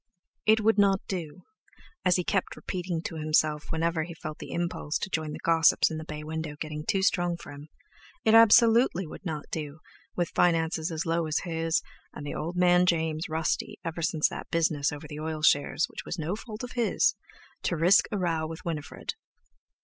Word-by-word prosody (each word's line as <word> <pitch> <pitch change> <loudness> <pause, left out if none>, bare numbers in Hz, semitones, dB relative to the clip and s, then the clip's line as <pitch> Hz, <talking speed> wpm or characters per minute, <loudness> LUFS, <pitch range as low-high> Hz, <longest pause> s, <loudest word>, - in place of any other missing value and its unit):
It 220 +1 +5
would 220 0 +3
not 195 -1 +4
do, 170 -6 -5 0.6
as 180 -1 +4
he 180 - +1
kept 190 +1 -1
repeating 175 -2 -4
to 165 - -5
himself 155 -1 +1
whenever 165 0 0
he 165 +1 -6
felt 155 -2 -7
the - - -8
impulse 170 -3 -2
to 195 - -5
join 155 -1 -2
the - - -5
gossips 165 0 +4
in 160 - -3
the - - -6
bay 150 -1 -7
window 160 -1 -4
getting 150 -1 -5
too 195 -4 +1
strong 175 -3 +1
for - - -11
him—it 160 - -5
absolutely 225 -3 +6
would 155 - -10
not 155 -5 -4
do, 150 -2 -4 0.4
with 175 -1 0
finances 165 -1 +1
as 160 0 -3
low 165 0 0
as 155 - 0
his, 165 -1 0 0.3
and 145 - -8
the 145 - -4
"old 170 +3 -4
man" 180 0 +4
(James) 160 -2 0
rusty 160 0 -1
ever 165 0 -4
since 155 -1 +2
that - - -7
business 155 -3 +1
over 145 -1 -8
the 150 -1 -7
oil 155 0 -4
shares, 145 +2 +3
which - - -8
was 175 - -5
no 165 +4 -2
fault 220 +1 -8
of 250 - -6
his, 240 -2 +2 0.5
to 175 - -1
risk 175 +6 +5
a 210 - -1
row 165 -4 0
with 165 +2 -9
Winifred. 155 -4 -4
165 Hz, 195 wpm, -28 LUFS, 155-180 Hz, 0.6 s, absolutely